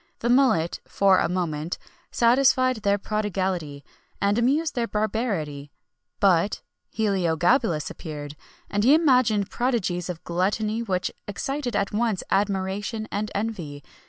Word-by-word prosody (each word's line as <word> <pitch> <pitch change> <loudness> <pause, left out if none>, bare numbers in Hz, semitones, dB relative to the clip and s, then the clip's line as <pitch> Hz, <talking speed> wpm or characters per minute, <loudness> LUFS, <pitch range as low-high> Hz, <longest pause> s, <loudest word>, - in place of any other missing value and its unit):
The 235 - -2
mullet 245 -11 +3
for 195 -2 +4
a - - +1
moment 170 -2 -2 0.3
satisfied 255 +1 +3
their 200 -1 +1
prodigality, 190 -8 -2 0.4
and 200 +1 +2
amused 285 +7 +1
their 235 -2 -1
barbarity; 200 - -2 0.5
but 195 0 +2 0.3
Heliogabalus 180 - +1
appeared, 150 -2 -7 0.3
and 205 0 -1
he 270 +6 +7
imagined 250 - +3
prodigies 190 -8 -1
of 175 -2 -6
gluttony 210 +6 -1
which 185 -5 -1 0.2
excited 255 +5 -3
at 200 - 0
once 220 -3 0
admiration 200 +2 -1
and 210 +1 -2
envy. 180 -10 -4
200 Hz, 120 wpm, -25 LUFS, 175-230 Hz, 0.5 s, he